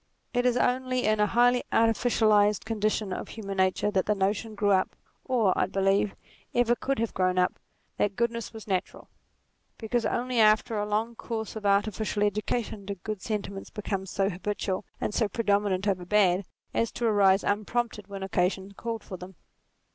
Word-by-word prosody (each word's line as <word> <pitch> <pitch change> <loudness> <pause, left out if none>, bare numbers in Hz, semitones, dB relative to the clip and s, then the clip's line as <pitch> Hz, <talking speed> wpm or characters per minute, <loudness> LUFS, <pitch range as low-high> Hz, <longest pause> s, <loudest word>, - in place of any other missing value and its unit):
It 245 0 +2
is 245 0 +2
only 255 0 +1
in 215 0 +2
a 210 - +4
highly 245 +2 +3
artificialized 220 -2 +3
condition 215 -2 -1
of - - -5
human 200 -3 -6
nature 190 +2 +2
that 190 -2 0
the 210 - +2
notion 205 +3 -1
grew 205 0 +2
up, 190 -1 +2 0.3
or, 230 -8 +2
I - - +1
believe, 195 +1 +1 0.4
ever 240 0 +4
could 275 +2 -2
have 230 0 -1
grown 185 -1 +1
up, 180 0 +1 0.4
that 200 -1 0
goodness 235 -1 -1
was 220 -2 -10
natural: 190 -2 -3 0.7
because 235 +1 -1
only 245 +1 0
after 215 +1 +4
a 210 0 -1
long 220 +3 -1
course 220 -1 -5
of 210 -2 -2
artificial 205 +1 +1
education 210 +1 -1
did 195 -2 -7
good 215 -3 -4
sentiments 200 -3 -4
become 195 -3 -4
so 195 +1 0
habitual, 195 0 -3
and - - -2
so 220 - +2
predominant 205 -2 +1
over 185 -3 0
bad, 190 -1 +3 0.3
as 230 - 0
to 240 - -2
arise 200 -3 +4
unprompted 210 0 -1
when 195 -1 -6
occasion 190 +1 0
called 225 +2 -5
for 185 - -7
them. 180 +1 -10
210 Hz, 170 wpm, -28 LUFS, 195-225 Hz, 0.7 s, a